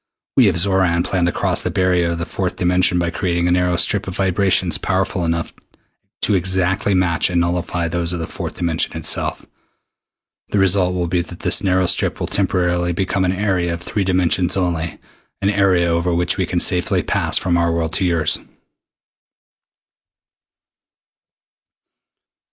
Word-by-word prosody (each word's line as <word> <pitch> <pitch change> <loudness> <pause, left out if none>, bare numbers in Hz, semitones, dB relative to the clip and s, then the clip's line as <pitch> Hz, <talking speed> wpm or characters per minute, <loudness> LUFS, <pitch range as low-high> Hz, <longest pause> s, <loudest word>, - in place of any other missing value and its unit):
We 125 -5 +5
of 95 - +2
Xoran 90 -1 +2
plan 90 -2 0
to 85 - +1
cross - - 0
the - - -2
barrier 90 -2 +1
of 85 - -2
the 85 - -3
fourth 90 +2 -3
dimension 90 0 +1
by 85 -1 0
creating 85 -1 -1
a - - +1
narrow 90 0 +1
strip 100 +3 +1
of 95 - -5
vibrations 95 -2 +1
powerful 95 -1 -1
enough 85 0 -2 0.7
to 105 - +2
exactly 95 +1 +1
match 90 -2 +2
and 90 -1 +1
nullify 85 0 -1
those 85 0 -2
of 90 - -2
the 80 - -4
fourth - - -7
dimension 85 -2 -1
itself. - - -1 1.0
The - - -1
result 95 -1 +3
will 90 -1 -1
be 85 +1 0
that 90 0 -10
this - - +3
narrow 95 -1 +2
strip - - +1
will - - -2
temporarily 90 -2 0
become 95 +2 -1
an 90 - +1
area 95 -3 -1
of 85 - -10
three 100 +3 -2
dimensions 90 -1 +1
only, 85 -3 -2 0.4
an 100 - +1
area 95 -4 +2
over 85 +1 0
which 85 0 0
we 95 - -1
can 90 - -1
safely 90 0 +1
pass - - +1
from 90 -2 0
our 85 0 +1
world 85 -1 -2
to 95 - 0
yours." 85 -4 +1
90 Hz, 165 wpm, -19 LUFS, 85-95 Hz, 1.0 s, We